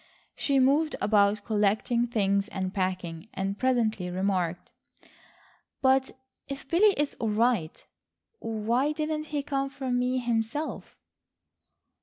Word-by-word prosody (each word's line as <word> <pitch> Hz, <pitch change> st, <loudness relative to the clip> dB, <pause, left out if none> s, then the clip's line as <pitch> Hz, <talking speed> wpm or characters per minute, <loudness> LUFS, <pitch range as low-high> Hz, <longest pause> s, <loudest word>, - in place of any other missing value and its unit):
She 280 Hz, -1 st, +1 dB
moved 285 Hz, +4 st, +3 dB
about 205 Hz, -1 st, +2 dB
collecting 215 Hz, +3 st, +1 dB
things 200 Hz, -3 st, +1 dB
and 190 Hz, -3 st, -4 dB
packing, 185 Hz, -2 st, -3 dB
and 195 Hz, +1 st, -2 dB
presently 225 Hz, -8 st, +1 dB
remarked: 180 Hz, -2 st, -1 dB, 1.1 s
"But 265 Hz, 0 st, +2 dB, 0.3 s
if 275 Hz, 0 st, -7 dB
Billy 400 Hz, +4 st, +4 dB
is 295 Hz, -1 st, 0 dB
all 225 Hz, -, 0 dB
right, 215 Hz, -6 st, 0 dB, 0.5 s
why 230 Hz, +6 st, 0 dB
didn't 305 Hz, 0 st, -2 dB
he 295 Hz, -2 st, -3 dB
come 275 Hz, -1 st, -1 dB
for 270 Hz, -1 st, -5 dB
me 250 Hz, +1 st, +1 dB
himself?" 240 Hz, +4 st, -2 dB
235 Hz, 115 wpm, -28 LUFS, 200-275 Hz, 1.1 s, Billy